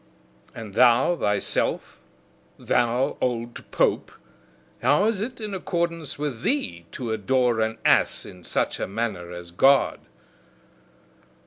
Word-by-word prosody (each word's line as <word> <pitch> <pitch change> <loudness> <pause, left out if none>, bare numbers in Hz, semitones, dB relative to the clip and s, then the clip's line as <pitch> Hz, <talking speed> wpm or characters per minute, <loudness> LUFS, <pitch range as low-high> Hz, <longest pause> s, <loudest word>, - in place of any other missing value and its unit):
And 110 -3 -8
thou 125 - +5
thyself, 105 - -1 0.6
thou 125 +3 0
old 120 -1 -3
pope, - - +1 0.7
how 145 - +3
is 215 -3 0
it 245 +4 -5
in 210 -2 -5
accordance 170 -5 -2
with 140 -6 -4
thee, 85 - -1
to 120 -3 -4
adore 120 +2 +1
an 110 0 0
ass - - +3
in 90 -1 -12
such - - -1
a - - -2
manner 95 -4 -3
as 85 -1 -9
God?" 135 +10 +4
120 Hz, 120 wpm, -24 LUFS, 110-150 Hz, 0.7 s, thou